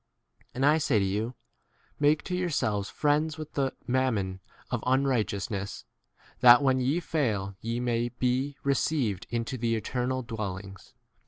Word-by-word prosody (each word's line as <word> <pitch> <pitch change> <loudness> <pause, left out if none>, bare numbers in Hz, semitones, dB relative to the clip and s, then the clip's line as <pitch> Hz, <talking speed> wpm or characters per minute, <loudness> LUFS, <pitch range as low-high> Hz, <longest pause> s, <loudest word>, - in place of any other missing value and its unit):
And 135 +2 +1
I 150 +2 +5
say 140 -6 +2
to 100 - +2
you, 105 +6 -2 0.6
Make 150 +1 +3
to 180 - -3
yourselves 115 - 0
friends 155 +2 +1
with 155 -1 -8
the 135 -2 -1
mammon 115 -8 0 0.3
of - - -2
un 130 +2 +2
righteousness, 105 -5 -2 0.5
that 125 +3 +8
when 130 -1 +3
ye 135 +7 +1
fail 110 - -1
ye 115 +1 -2
may 120 -1 0
be 130 +3 -1
received 140 - 0
3 - - -4
into 115 +2 -3
the 115 0 0
10 - - +1
eternal 125 +3 -2
dwellings. 100 -4 -6
125 Hz, 155 wpm, -28 LUFS, 110-140 Hz, 0.6 s, that